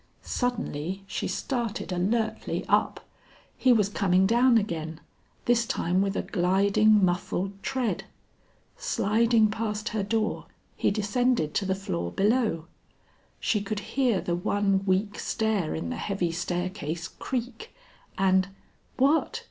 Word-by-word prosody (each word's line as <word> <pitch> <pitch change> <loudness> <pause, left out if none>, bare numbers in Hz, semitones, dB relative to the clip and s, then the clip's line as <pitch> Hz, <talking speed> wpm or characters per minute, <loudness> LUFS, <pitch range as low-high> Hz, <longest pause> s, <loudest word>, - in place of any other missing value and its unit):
Suddenly 195 - -2
she - - -3
started 235 -5 -3
alertly 215 +5 -1
up; - - +1 0.5
he 260 - +3
was 215 -5 +4
coming 190 -2 +2
down 235 +3 +5
again, 165 -6 -3 0.5
this 240 -1 +3
time 180 +3 +1
with 195 0 0
a - - -1
gliding 200 +3 +3
muffled 185 +2 -2
tread. 260 -2 -1 0.7
Sliding 225 - +2
past 215 0 -2
her 215 - -1
door, 215 +2 -1 0.3
he - - +1
descended 215 -3 +1
to 200 - 0
the 190 0 0
floor 85 - -3
below. 210 - +1 0.7
She 210 - +1
could 205 +1 -3
hear 250 -7 +2
the 175 - -2
one 195 +2 +1
weak 200 +2 +1
stair 215 -7 0
in 160 - -4
the - - -3
heavy 195 -4 -1
staircase 175 -1 -3
creak, 255 - -5 0.5
and 190 -1 +3 0.5
What! 280 +5 +2
205 Hz, 125 wpm, -27 LUFS, 185-230 Hz, 0.7 s, down